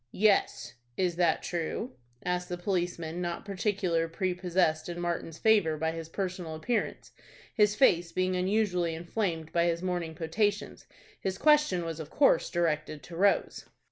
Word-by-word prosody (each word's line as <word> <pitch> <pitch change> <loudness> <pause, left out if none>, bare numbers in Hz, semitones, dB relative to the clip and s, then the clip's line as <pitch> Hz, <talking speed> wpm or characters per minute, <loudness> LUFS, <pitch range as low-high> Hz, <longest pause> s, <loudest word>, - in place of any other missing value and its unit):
"Yes." 205 -1 +2 0.2
"Is 180 -2 +1
that 175 -2 +2
true?" 175 +8 -3 0.3
asked 180 0 -1
the 175 - -3
policeman, 175 -2 -2
not 175 +1 -4
particularly 190 -4 0
prepossessed 180 -3 0
in 175 0 -5
Martin's 170 -2 -3
favor 200 -8 +3
by 160 +1 0
his 165 -1 -7
personal 180 -3 -4
appearance, 220 +8 -2 0.4
his 210 -2 +3
face 175 -8 +3
being 185 0 0
unusually 180 -3 +1
inflamed 170 -2 -3
by 170 0 +3
his 170 0 0
morning 175 -3 -2
potations. 205 +6 -1 0.3
His 190 -1 -3
question 300 - +3
was 165 -1 -5
of 155 -2 -7
course 275 - +3
directed 155 -4 -1
to 165 - -10
Rose. 195 +3 +1
175 Hz, 145 wpm, -29 LUFS, 165-195 Hz, 0.4 s, favor